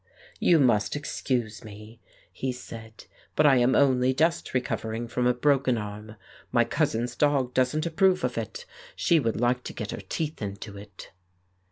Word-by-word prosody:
"You 170 - +5
must 120 -7 +2
excuse 125 -6 -3
me," 105 +1 -12 0.3
he 130 - -2
said, 115 -3 -10 0.3
"but 155 - +3
I 140 -3 +6
am 125 +1 +3
only 130 -2 +3
just 165 +4 +1
recovering 115 -2 -2
from 125 +1 0
a 125 - +4
broken 135 -2 +2
arm. 105 0 -7 0.4
My - - +4
cousin's 120 +2 -1
dog 140 -4 +1
doesn't 130 +5 +1
approve 185 +3 +2
of - - -1
it; 480 0 -5 0.3
she 170 -2 +3
would 115 -6 -1
like 125 +1 +1
to - - -6
get 105 -2 -5
her - - -6
teeth 155 -5 -3
into 100 0 -6
it." 100 -1 -12
125 Hz, 165 wpm, -27 LUFS, 110-145 Hz, 0.4 s, I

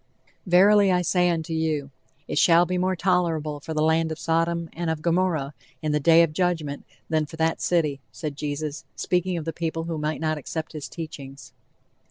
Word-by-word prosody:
"Verily 195 +2 +6
I 180 0 +2
say 180 +1 +2
unto 165 -1 -2
you, 155 -3 -1 0.4
it - - 0
shall 170 0 +6
be 180 +1 -1
more 185 +1 +1
tolerable 170 -5 0
for 160 +2 -6
the 155 - +2
land 160 0 +2
of 160 - -4
Sodom 165 0 0
and 170 0 -3
of 160 -1 -3
Gomorrah, 170 -5 +1 0.3
in 155 - 0
the 150 - +2
day 165 +3 +6
of 160 -2 -1
judgment, 160 -5 -1 0.2
than 155 -1 0
for 160 - -10
that 160 0 0
city," 150 -6 +1
said 150 -3 -5
Jesus, 150 +1 -4
speaking 180 0 0
of 160 - -5
the 165 - -3
people 165 0 -3
who 165 -1 -4
might 155 +1 -2
not 155 -1 -1
accept 160 +4 -5
his 150 -2 -6
teachings. 140 -4 -9
160 Hz, 195 wpm, -25 LUFS, 155-175 Hz, 0.4 s, Verily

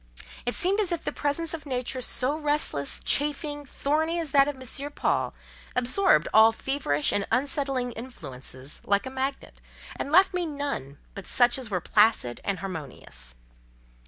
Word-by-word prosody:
It 245 - +1
seemed 390 +4 +2
as 395 -4 +2
if 340 -2 -2
the - - -2
presence 310 +3 0
of 315 -2 -6
a - - -9
nature 255 0 -2
so 255 +3 +2
restless, 295 - 0
chafing, 290 0 0
thorny 315 +5 0
as 320 -4 -2
that 275 0 +5
of 290 -2 -4
M. 275 +3 -5
Paul - - 0 0.4
absorbed 255 +11 +3
all 220 +1 +8
feverish 225 - 0
and 200 - 0
unsettling 270 0 0
influences 135 - -7
like 200 0 +1
a 260 - -6
magnet, 265 +1 -4 0.3
and 280 - -4
left 375 +4 +6
me 355 -2 -1
none 285 - -4 0.2
but 200 -2 -8
such 245 +1 +4
as 250 -4 -4
were 180 -4 -1
placid 210 - +2
and 200 -2 -1
harmonious. 140 - -7
265 Hz, 160 wpm, -27 LUFS, 210-295 Hz, 0.4 s, all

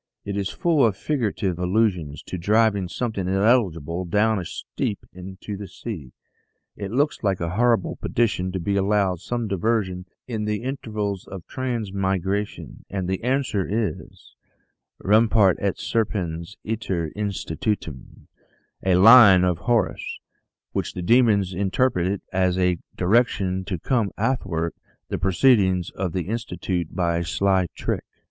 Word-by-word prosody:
It 100 -1 -3
is 100 -1 -1
full 170 -6 +2
of 110 -5 +2
figurative 105 - -1
allusions 90 -5 0
to 90 - -6
driving 105 0 +2
something 110 -4 -3
illegible 95 - +1
down 105 +4 +2
a 90 - -5
steep 100 +4 -4
into 95 +3 -8
the 100 0 -7
sea. 85 - -7 0.6
It 100 -2 -5
looks 140 +7 0
like 100 -3 0
a 85 -1 -2
humble 115 0 +1
petition 105 -6 0
to 95 - -2
be 100 +4 -1
allowed 100 -2 +1
some 120 +4 -3
diversion 95 -2 -1 0.2
in 110 -4 -3
the 105 +1 -2
intervals 105 -7 -3
of 95 -4 -8
transmigration; 100 -5 -2
and 95 -2 -3
the 95 +2 -2
answer 125 -6 0
is: 110 +1 -4 0.3
" - - -54
'Rumpat 105 -2 +4
et 100 -2 -1
serpens 95 -5 -2
iter 95 -8 -2
institutum' 100 - -4 0.6
a 95 -1 +3
line 100 -2 +8
of 90 -2 +1
Horace, 120 +2 0 0.5
which - - -3
the 90 - -4
demons 105 -3 +3
interpret 95 -1 0
as 90 -1 +2
a 90 -2 +2 0.2
direction 95 -2 +2
to 90 - -3
come 115 +3 0
athwart 95 -8 -1 0.4
the - - -2
proceedings 95 -2 +3
of 90 -3 -3
the 90 - -1
Institute 90 -5 -3
by 85 -2 +1
a - - -2
sly 95 +2 +1
trick." - - -2
100 Hz, 140 wpm, -23 LUFS, 90-110 Hz, 0.6 s, line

